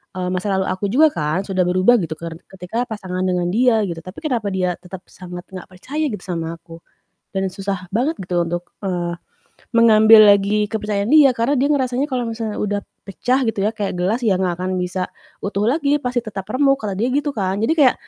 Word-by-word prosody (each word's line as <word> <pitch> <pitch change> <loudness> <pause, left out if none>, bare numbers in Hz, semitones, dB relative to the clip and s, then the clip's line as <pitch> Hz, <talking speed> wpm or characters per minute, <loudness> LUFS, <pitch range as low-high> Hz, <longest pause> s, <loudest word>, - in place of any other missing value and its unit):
eee, 180 -1 -2
masa 185 +2 -2
lalu 190 - +1
aku 185 +2 -3
juga 300 +7 +6
kan 155 +2 -1
sudah 185 -2 +1
berubah 185 +7 +4
gitu, 160 -4 -3
ker 170 -1 -6 0.2
ketika 190 +6 -3
pasangan 185 -5 -4
dengan 180 -1 0
dia, 225 +1 +3
gitu, 170 -2 -5
tapi 185 +3 -10
kenapa 245 -9 -1
dia 180 -2 0
tetap 180 0 -10
sangat 180 -1 -9
nggak 185 -2 -8
percaya 280 +12 -4
gitu, 210 - -6
sama 165 -2 -4
aku 165 0 -13 0.6
dan 190 0 0
susah 195 -1 -4
banget 280 +8 0
gitu 175 -1 +1
untuk, 175 +1 -5
eee, 175 -3 -2 0.6
mengambil 220 -2 +7
lagi 205 +1 +3
kepercayaan 210 -1 -2
dia, 300 -3 +7
karena 235 +5 +1
dia 275 +3 +2
ngerasanya, 260 -1 0
"Kalau 250 -2 -1
misalnya 225 -2 -4
udah 205 -1 -1 0.3
pecah" 250 +6 0
gitu 225 -3 -1
ya, 210 - +2
"kayak 205 -4 -3
gelas 195 +7 0
ya 200 -4 +3
nggak 185 -2 +1
akan 185 0 -2
bisa 180 0 -2 0.4
utuh 200 0 -1
lagi, 290 +2 +2
pasti 250 0 0
tetap 200 -4 -6
remuk," 275 +1 +3
kata 210 -2 -2
dia 235 +4 +1
gitu 290 +2 0
kan. 190 -2 -1
Jadi 225 - +2
kayak, 270 -4 +6
200 Hz, 205 wpm, -20 LUFS, 180-240 Hz, 0.6 s, mengambil